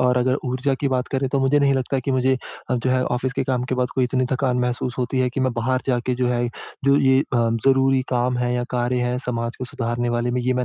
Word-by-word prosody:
और 125 0 +3
अगर 125 +1 +2
ऊर्जा 130 +2 0
की 140 - +1
बात 130 -1 -1
करें 135 0 0
तो 140 - 0
मुझे 135 +2 +3
नहीं 140 -1 +4
लगता 130 +1 -1
कि - - -1
मुझे 130 0 +2 0.4
अ, - - +2
जो 125 +1 0
है 130 0 +2
ऑफ़िस 125 +1 -1
के 135 - -1
काम 125 -1 -1
के - - +2
बाद 125 0 0
कोई 130 - +2
इतनी 130 +1 0
थकान 130 -1 +1
महसूस 125 0 -1
होती 125 +1 -1
है 130 -1 +2
कि 135 - -3
मैं 130 -1 +1
बाहर 125 +2 0
जाके 125 -1 0
जो 125 - +2
है, 120 0 0 0.4
जो 140 0 +5
ये 130 -1 +4
अ, - - -1 0.4
ज़रूरी 135 0 +4
काम 125 0 0
है 125 0 0
या 125 - 0
कार्य 125 0 0
है 125 0 -1
समाज 115 -1 -2
को 130 - -4
सुधारने 120 -1 -2
वाले 120 0 0
में 125 +1 0
ये 130 +1 +1
मैं 125 0 0
125 Hz, 270 wpm, -22 LUFS, 125-130 Hz, 0.4 s, जो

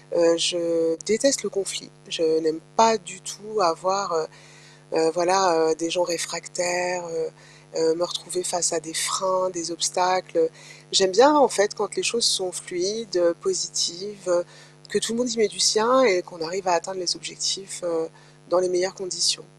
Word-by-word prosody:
Heu, 170 0 +5
je 165 0 +1
déteste 245 - +2
le 205 - -3
conflit, 195 0 -5 0.2
je 170 - -2 0.2
n'aime 160 0 -2 0.2
pas 225 0 +6
du 180 -2 -12
tout 210 +6 -6
avoir, 185 +3 0
heu, 160 -1 0 0.7
heu, 160 0 +3
voilà, 175 -2 +3
heu, - - +2
des 165 0 -4
gens 180 +1 +1
réfractaires, 175 +1 -3
heu, 160 -1 -4 0.5
heu, 160 0 +3
me 175 - -4
retrouver 175 +1 -4
face 170 -2 +1
à 165 - -1
des 160 0 -11
freins, 185 +2 0
des 170 -2 -5
obstacles. 185 - 0 0.4
J'aime 190 -1 +5
bien 275 +9 +7
en 260 - +7
fait 205 -1 +1
quand 205 - -4
les 375 - -1
choses 235 -6 +1
sont 185 -1 +3
fluides, 190 +4 -4
heu, 170 -1 +3
positives, 180 +2 -2
heu, 175 0 +2 0.5
que 205 - +1
tout 225 - -2
le 230 - -3
monde 250 - -1
y 230 - -5
met 210 -2 +3
du 185 0 -8
sien 230 +9 +5
et 180 -5 +3
qu'on 175 -1 -16
arrive 185 +5 -5
à - - +3
atteindre 180 +3 -2
les 175 -2 +1
objectifs, 155 +3 -4
heu, 165 -1 -2 0.4
dans 175 - +4
les 185 - 0
meilleures 180 +1 -1
conditions. 170 -4 0
180 Hz, 185 wpm, -23 LUFS, 165-195 Hz, 0.7 s, bien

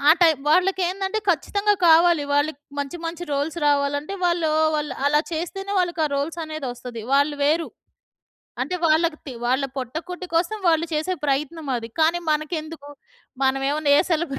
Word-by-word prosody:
ఆ - - +10
టైమ్ 320 -4 +5
వాళ్ళకేందంటే 380 +3 +1
ఖచ్చితంగా 405 +6 +1
కావాలి. 330 -1 +5
వాళ్ళకి 290 0 +1 0.2
మంచి 285 +4 -3
మంచి 340 +1 -5
రోల్స్ 290 +4 -1
రావాలంటే 285 +4 +1
వాళ్ళు 340 -2 +1 0.3
వాళ్ళు 300 0 -3
అలా 295 +1 +4
చేస్తేనే 390 +5 -4
వాళ్ళకి 345 -3 0
ఆ - - -3
రోల్సనేది 310 0 -4
వస్తది. 240 -2 -8
వాళ్ళు 285 +1 +3
వేరు. 320 +3 +2 0.9
అంటే 365 - -2
వాళ్ళకి 315 0 +2
తి 265 - -6
వాళ్ళ 260 +3 +1
పొట్ట 255 0 -5
కుట్టి 360 0 -6
కోసం 345 +6 +1
వాళ్ళు 330 0 +3
చేసే 315 +5 -1
ప్రయత్నం 295 +3 -2
అది. 230 -1 -6
కానీ 325 +2 +3
మనకెందుకు? 310 -1 -3 0.5
మనమేమన్నా 275 +3 +1
ఏ - - +6
సెలబ్ర 310 -4 -1
310 Hz, 150 wpm, -23 LUFS, 285-345 Hz, 0.9 s, ఆ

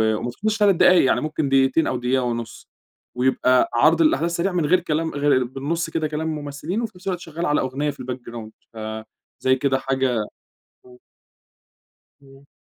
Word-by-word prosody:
ومافيهوش 200 - -2
3 205 -3 +4
دقايق 180 -4 +5
يعني - - +2
ممكن 155 -2 -2
دقيقتين 135 +3 +3
أو 130 - -1
دقيقة 125 +1 0
ونص. 120 -2 -5 0.5
ويبقى 130 0 +2
عرض 155 +7 +4
الأحداث 160 +2 +2
سريع 185 +3 0
من 175 -4 0
غير 180 +4 +4
كلام 160 -1 -2
غ 145 -3 +2
بالنص 150 +7 -3
كده 160 -1 -1
كلام 155 +1 -3
الممثلين، 150 +7 -4
وفي 230 - -4
نفس 180 - -13
الوقت 180 -2 -1
شغال 165 +2 -5
على 150 - +2
أغنية 135 +3 -2
في - - -7
الBackground 120 -3 -7 0.2
فزي 110 +4 -3
كده 135 0 +1
حاجة 130 -5 0 0.6
امم. 125 0 -16 1.2
امم. 135 0 -18
140 Hz, 160 wpm, -22 LUFS, 130-165 Hz, 1.2 s, دقايق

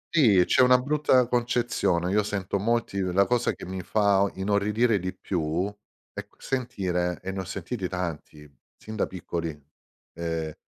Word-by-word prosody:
Sì 110 - +6
c'è - - +4
una 125 0 +7
brutta 140 -2 +3
concezione. 120 -7 0
Io 105 +2 +3
sento 100 -1 -2
molti 115 -1 0
uhm, 90 -1 -1
la 100 +2 +4
cosa 120 +1 +1
che - - -10
mi 95 +1 -5
fa 100 +2 +2
o 100 - +2
inorridire 105 +3 +1
di 90 +1 -3
più, 85 -2 -2 0.5
è - - -7
qu - - -31
sentire, 90 -9 -2
e 95 - -3
ne 95 - -5
ho - - -2
sentiti 95 +2 -4
tanti 80 -4 -5 0.3
sin 110 - -9
da 110 - 0
piccoli, 85 -4 -5 0.5
ehm 80 -2 -3
95 Hz, 170 wpm, -26 LUFS, 90-115 Hz, 0.5 s, una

